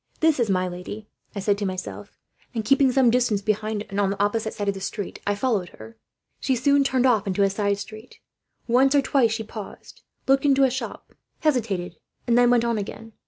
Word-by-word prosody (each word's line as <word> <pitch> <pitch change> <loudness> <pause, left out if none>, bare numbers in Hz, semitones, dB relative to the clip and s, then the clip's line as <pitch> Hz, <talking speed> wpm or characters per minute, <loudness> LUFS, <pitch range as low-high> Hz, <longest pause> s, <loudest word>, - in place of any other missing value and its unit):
"'This 320 -3 +3
is 235 -3 +1
my 185 -1 +1
lady,' 180 +4 -7 0.3
I - - -3
said 200 +1 +1
to 205 - -2
myself 185 -1 -7 0.4
and, 220 -2 -2
keeping 275 +2 +4
some 250 -2 +4
distance 240 -4 +2
behind 215 0 -1
and 200 - -4
on 200 -1 +2
the 195 0 -4
opposite 220 +2 0
side 205 - -3
of 200 - +2
the 195 0 -4
road, 205 - -5
I 205 - +2
followed 205 -6 -1
her. 110 +1 -12 0.4
"She 265 - 0
soon 280 +3 +3
turned 260 -2 +1
off 225 -5 +3
into 195 +1 +1
a 195 - +2
side 200 0 0
street. 215 +3 -10 0.5
Once 265 +4 +4
or 280 - +4
twice 265 -4 +2
she 225 0 -2
paused, 215 -1 -10 0.3
looked 270 0 +4
into 275 -1 +4
a 265 - +4
shop, 260 - -6 0.3
hesitated, 225 - -1 0.3
and 235 - +2
then 245 0 +5
went 240 -1 +3
on 235 -2 0
again. 225 +2 -8
220 Hz, 210 wpm, -24 LUFS, 200-255 Hz, 0.5 s, then